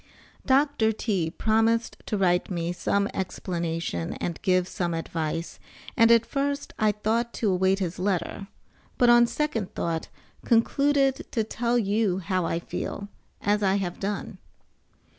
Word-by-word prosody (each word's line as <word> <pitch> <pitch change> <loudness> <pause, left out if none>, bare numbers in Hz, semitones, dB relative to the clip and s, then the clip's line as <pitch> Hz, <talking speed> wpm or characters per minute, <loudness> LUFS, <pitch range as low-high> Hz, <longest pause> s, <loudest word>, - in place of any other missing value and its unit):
Dr. 270 -5 +3
T. 200 -6 -1
promised 225 +5 +1
to 210 - -1
write 180 -2 +2
me 175 -2 -2
some 200 +3 0
explanation 170 - -3
and 170 - -4
give 185 -1 +2
some 175 -3 -2
advice, 165 0 -3 0.4
and 230 -2 +5
at 230 -1 +5
first 280 +3 -2
I 215 -1 +4
thought 225 +3 -1
to 210 -4 0
await 190 +1 +2
his 185 -2 -3
letter, 195 +1 -2 0.5
but 245 -1 +5
on 240 0 +6
second 235 -9 -2
thought 165 -1 -2 0.4
concluded 275 +4 +2
to 225 - +1
tell 235 +2 0
you 205 -3 +1
how 185 -1 -1
I 165 - -1
feel, 200 +3 -5 0.3
as 210 0 +1
I 195 -1 +3
have 185 -3 -3
done. 200 +1 -4
200 Hz, 140 wpm, -26 LUFS, 180-230 Hz, 0.5 s, on